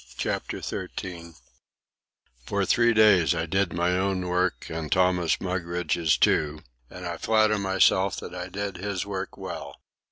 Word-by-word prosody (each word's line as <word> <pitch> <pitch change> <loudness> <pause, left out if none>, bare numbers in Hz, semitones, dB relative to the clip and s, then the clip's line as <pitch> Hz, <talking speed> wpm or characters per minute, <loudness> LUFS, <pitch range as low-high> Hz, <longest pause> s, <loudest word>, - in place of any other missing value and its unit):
CHAPTER - - -3
XIII 85 -2 -6 1.1
For 100 -1 0
three 120 +3 +4
days 105 -6 +5
I 80 0 -1
did 95 +2 0
my 85 +1 0
own 95 0 0
work 90 +1 0
and 80 -1 -5
Thomas 90 -2 +2
Mugridge's 85 -3 0
too; 75 0 +1 0.3
and 90 0 -9
I 85 -1 -4
flatter 110 -1 +2
myself 95 0 +3
that - - -9
I 90 0 -5
did 100 -1 -4
his 100 0 -3
work 100 -1 -5
well. - - -7
90 Hz, 140 wpm, -26 LUFS, 85-100 Hz, 1.1 s, days